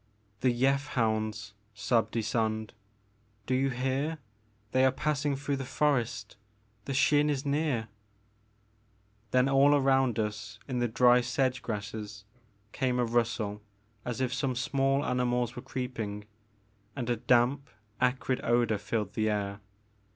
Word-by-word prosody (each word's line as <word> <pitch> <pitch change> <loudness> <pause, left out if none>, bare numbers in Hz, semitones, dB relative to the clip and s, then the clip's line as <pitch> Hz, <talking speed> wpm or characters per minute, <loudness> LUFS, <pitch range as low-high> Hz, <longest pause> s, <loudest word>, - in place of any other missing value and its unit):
*'The 130 - +3
Yeth 135 +4 +1
hounds!'' 110 -3 -1 0.2
sobbed 115 +3 0
Ysonde, 110 -1 -1 0.7
^Mo 130 - 0
you 135 +1 +2
hear! 135 +5 -1 0.3
— 105 0 -38
they 130 0 +3
are 130 - +5
passing 145 +1 -1
through 140 +1 -2
the 135 - -4
forest! 120 -8 -1 0.5
The 135 - -3
Xin 145 +2 +3
is 145 -1 -1
near! 140 -6 0 0.7
'' 105 0 -38
Then 125 +4 +3
all 135 +1 +5
around 135 -4 +3
us 105 -1 -3
in 130 -3 -2
the 120 - +1
dry 125 +2 +5
sedge 130 +1 0
grasses 105 -3 -6 0.5
came 125 -2 0
a 125 - +2
rustle 115 -3 -1 0.4
as 125 +1 -3
if 125 -1 0
some 135 -1 -1
small 135 +2 +1
animals 125 -1 0
were 125 - -6
creeping, 110 -6 -5 0.7
and 125 -4 -4
a 120 -1 0
damp 125 +4 +2 0.3
acrid 130 0 +1
odor 120 -3 +2
filled 105 -1 -2
the 110 0 +1
air. 100 -1 -2
125 Hz, 140 wpm, -29 LUFS, 110-135 Hz, 0.7 s, are